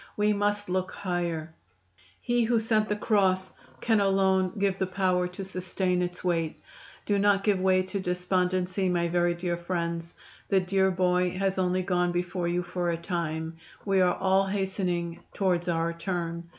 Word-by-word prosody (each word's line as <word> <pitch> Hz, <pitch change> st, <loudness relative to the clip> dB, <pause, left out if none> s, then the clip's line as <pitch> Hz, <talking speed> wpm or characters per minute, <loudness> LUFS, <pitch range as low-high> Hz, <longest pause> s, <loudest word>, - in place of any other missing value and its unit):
We 210 Hz, 0 st, +3 dB
must 205 Hz, 0 st, 0 dB
look 185 Hz, +1 st, -1 dB
higher. 170 Hz, -4 st, -3 dB, 0.7 s
He 240 Hz, -1 st, +1 dB
who 235 Hz, 0 st, +2 dB
sent 220 Hz, -1 st, +1 dB
the 210 Hz, -, +1 dB
cross 190 Hz, -3 st, +1 dB, 0.3 s
can 225 Hz, -2 st, +3 dB
alone 190 Hz, -1 st, +2 dB
give 195 Hz, -1 st, 0 dB
the 190 Hz, -, 0 dB
power 185 Hz, -1 st, +1 dB
to 180 Hz, +2 st, -7 dB
sustain 185 Hz, -1 st, -1 dB
its 175 Hz, 0 st, -4 dB
weight. 165 Hz, -3 st, -1 dB, 0.5 s
Do 205 Hz, -1 st, +1 dB
not 200 Hz, -1 st, +3 dB
give 205 Hz, -3 st, +2 dB
way 185 Hz, 0 st, +3 dB
to 190 Hz, +2 st, -4 dB
despondency, 180 Hz, +1 st, 0 dB
my 170 Hz, -1 st, +1 dB
very 175 Hz, 0 st, +2 dB
dear 175 Hz, 0 st, -2 dB
friends. 170 Hz, -1 st, -3 dB, 0.3 s
The 195 Hz, -, +4 dB
dear 190 Hz, +1 st, +2 dB
boy 180 Hz, 0 st, +1 dB
has 195 Hz, 0 st, 0 dB
only 185 Hz, 0 st, +1 dB
gone 180 Hz, -1 st, +1 dB
before 175 Hz, 0 st, -2 dB
you 175 Hz, +1 st, 0 dB
for 175 Hz, 0 st, -2 dB
a 170 Hz, -, 0 dB
time 165 Hz, -2 st, -3 dB, 0.3 s
we 195 Hz, -2 st, +3 dB
are 180 Hz, -1 st, +3 dB
all 190 Hz, 0 st, +2 dB
hastening 190 Hz, -3 st, -2 dB, 0.2 s
towards 180 Hz, -3 st, +1 dB
our 165 Hz, 0 st, 0 dB
turn. 170 Hz, -1 st, -4 dB
185 Hz, 165 wpm, -28 LUFS, 175-195 Hz, 0.7 s, The